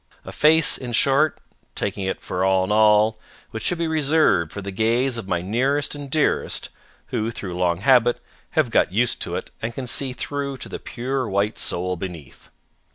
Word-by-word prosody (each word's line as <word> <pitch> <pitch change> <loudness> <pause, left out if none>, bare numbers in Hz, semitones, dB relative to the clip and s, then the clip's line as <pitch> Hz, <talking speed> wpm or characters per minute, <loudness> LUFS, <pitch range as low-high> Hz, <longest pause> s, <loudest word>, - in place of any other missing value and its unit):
A - - -7
face, 160 +1 +4
in 125 -2 -6
short, 140 +5 +3 0.4
taking 100 -1 -3
it 95 - -3
for 90 - -2
all 95 0 +3
in 95 - -3
all, 110 0 +4 0.3
which 110 - -5
should 175 - +1
be 165 0 -1
reserved 150 - +2
for - - -6
the 100 0 -5
gaze 115 +6 +1
of 115 -5 -6
my 90 -2 -1
nearest 135 +8 0
and 145 -1 -7
dearest 150 +1 0 0.4
who, 110 +1 -1
through 100 -6 -6
long 90 -1 0
habit, 120 0 +4 0.4
have 145 -7 +3
got - - +3
used 115 +5 0
to - - -3
it - - -5
and 115 +1 -4
can 135 - -4
see 130 +1 -2
through 140 +2 -4
to - - -7
the - - -6
pure 130 0 -3
white 100 +3 0
soul 90 +1 -1
beneath. 85 -7 -9
115 Hz, 190 wpm, -22 LUFS, 95-135 Hz, 0.4 s, face